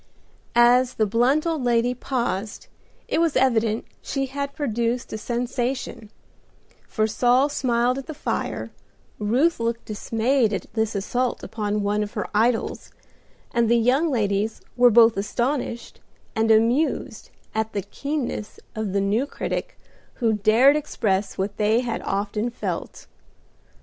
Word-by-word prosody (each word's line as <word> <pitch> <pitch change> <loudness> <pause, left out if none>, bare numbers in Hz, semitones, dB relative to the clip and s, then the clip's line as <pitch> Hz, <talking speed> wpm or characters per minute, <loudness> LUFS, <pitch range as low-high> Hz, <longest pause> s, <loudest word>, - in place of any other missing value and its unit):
As 245 +1 +5
the 215 - +2
blunt 245 - +2
old 320 -5 -1
lady 240 0 +2
paused 235 -5 -3 0.4
it 325 - +1
was 330 -3 +1
evident 230 -4 +2 0.2
she 275 -1 -2
had 280 +1 -5
produced 235 -3 -2
a - - -2
sensation, 245 -1 -3 0.8
for 215 - 0
Saul 245 +5 +3
smiled 250 -2 +1
at 270 - -9
the 315 - -6
fire, - - -3 0.5
Ruth 250 +11 +2
looked 230 0 -2
dismayed 225 +2 0
at 195 - -3
this 220 -2 -1
assault 245 +5 -1
upon 210 -1 -2
one 205 +1 0
of 210 -1 -4
her 210 - -3
idols, 225 +2 0 0.6
and 235 -1 +2
the 235 - +5
young 260 +8 +3
ladies 210 -3 0
were 245 0 +6
both 230 -1 +6
astonished 240 +3 -2 0.4
and 225 0 +1
amused 230 +8 +1 0.2
at 220 0 -2
the 200 - -2
keenness 275 - -4
of 215 -3 -3
the 200 - +2
new 215 +8 +1
critic - - -4 0.4
who 230 -3 +1
dared 220 +7 +5
express 210 -9 -1
what 195 +2 -3
they 220 +2 +3
had 235 -2 -3
often 210 +3 -2
felt. 240 - -5
235 Hz, 140 wpm, -24 LUFS, 215-255 Hz, 0.8 s, were